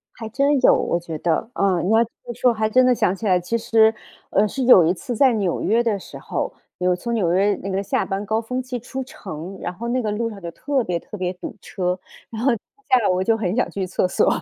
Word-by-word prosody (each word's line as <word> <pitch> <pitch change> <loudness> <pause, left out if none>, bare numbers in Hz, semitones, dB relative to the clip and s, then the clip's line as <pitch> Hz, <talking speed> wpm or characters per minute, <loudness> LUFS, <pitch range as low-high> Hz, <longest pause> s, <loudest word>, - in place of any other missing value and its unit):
还 225 - -7
真 275 +4 +2
有， - - +7
我 170 - 0
觉 165 -2 -6
得， 170 +6 0
啊， 185 -4 +1
你 185 - 0
要 225 +1 +5
这 235 - -9 0.2
么 240 - -5
说 245 +1 +2
还 215 -1 0
真 255 +3 +5
的 250 - +5
想 185 - +1
起 220 - -7
来， 180 -2 +4
其 205 +7 -1
实 220 0 +4 0.4
呃， 205 +2 +3
是 265 +5 -3
有 195 -9 +7
一 175 - +3
次 245 +4 -5
在 265 +2 +5
纽 195 -5 -1
约 230 +3 +2
的 210 -4 0
时 - - -10
候， - - -3 0.3
有 180 0 +2
从 235 +6 -4
纽 185 -7 +1
约 200 +2 +3
那 195 - -5
个 195 +1 -1
下 - - 0
班 195 +2 -3
高 220 +2 0
峰 250 +3 -3
期 250 -1 -5
出 260 +3 -5
城， 185 -5 -8
然 175 - -3
后 235 +6 -6
那 255 +1 +1
个 215 - -2
路 230 +2 -1
上 205 -3 -10
就 170 - -5
特 275 +5 -1
别 175 -3 -2
特 210 - -10
别 185 -1 -1
堵 180 - -8
车， 180 -2 -2 0.3
然 220 - -5
后 270 - +4
下 255 - -1
来 215 - +1
我 185 0 +1
就 225 +2 +2
很 195 -1 -1
想 250 - +1
去 195 -2 -3
厕 185 0 0
所。 - - +2
215 Hz, 285 characters per minute, -22 LUFS, 185-235 Hz, 0.4 s, 有